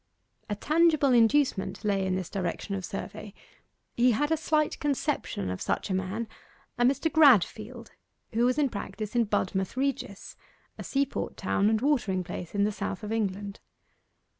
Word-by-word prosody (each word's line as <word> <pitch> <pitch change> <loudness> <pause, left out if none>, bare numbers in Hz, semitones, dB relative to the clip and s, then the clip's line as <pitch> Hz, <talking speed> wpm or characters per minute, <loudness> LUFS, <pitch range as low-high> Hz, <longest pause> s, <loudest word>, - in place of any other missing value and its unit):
A 205 - -1
tangible 310 +2 +3
inducement 235 -3 +2
lay 195 -2 +1
in 185 - 0
this 185 -2 -4
direction 190 +1 -3
of 195 -1 -3
survey. 205 +1 -7 0.6
He 245 0 +4
had 295 +7 0
a - - +5
slight 310 -1 0
conception 280 - -1
of 95 - -5
such - - -2
a - - +1
man 190 +5 -2 0.5
a - - +4
Mr. 275 +5 +2
Gradfield 235 - +3 0.4
who 230 +2 +2
was 250 +2 +2
in 290 -3 +2
practice 215 0 -6
in 235 -1 +3
Budmouth 190 0 -1
Regis, 265 -7 -3 0.4
a - - -5
seaport 275 0 -2
town 205 +1 +1
and 220 0 +1
watering 235 -10 +1
place 175 +1 -7
in 200 - +2
the 210 - +2
south 200 0 -4
of 210 - -5
England. 200 -2 -2
220 Hz, 165 wpm, -28 LUFS, 195-275 Hz, 0.6 s, a